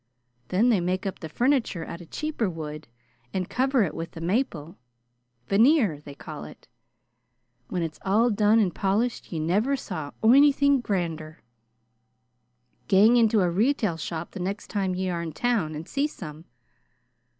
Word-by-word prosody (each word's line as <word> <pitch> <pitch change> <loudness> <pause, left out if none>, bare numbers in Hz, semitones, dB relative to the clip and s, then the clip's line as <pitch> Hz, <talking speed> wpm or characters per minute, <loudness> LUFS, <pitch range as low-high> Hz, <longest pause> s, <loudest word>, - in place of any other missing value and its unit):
Then 210 +7 +2
they 220 -6 +3
make 185 +2 -1
up 195 - -4
the 160 - -7
funiture 240 - 0
out 170 - -7
of 170 - -13
cheaper 305 -9 -2
wood 155 -3 -7 0.5
and 185 -1 -1
cover 260 -1 +2
it 175 - -2
with 165 0 -6
the 165 - -8
maple 170 - -2 0.7
veneer, 220 - +3
they 145 -1 -10
call 155 +1 -8
it. - - -13 1.0
When 180 -2 -2
it's 160 -2 -5
all 220 +5 +3
done 210 +1 +3
and 195 -6 +2
polished 215 +5 -1
ye 170 - -3
never 200 - +1
saw 160 - -5
onythin' 280 +3 +5
grander. 165 -7 -3 1.4
Gang 210 +5 +6
into 225 -3 +4
a 180 -2 +2
retail 215 - +1
shop 160 +1 -5
the 195 - -8
next 195 +3 -4
time 195 -3 -1
ye 185 +1 -2
are 170 -1 -2
in 165 -2 -5
town 205 -8 0
and 155 +2 -7
see 280 +2 0
some. 160 - -10
190 Hz, 160 wpm, -26 LUFS, 165-235 Hz, 1.4 s, Gang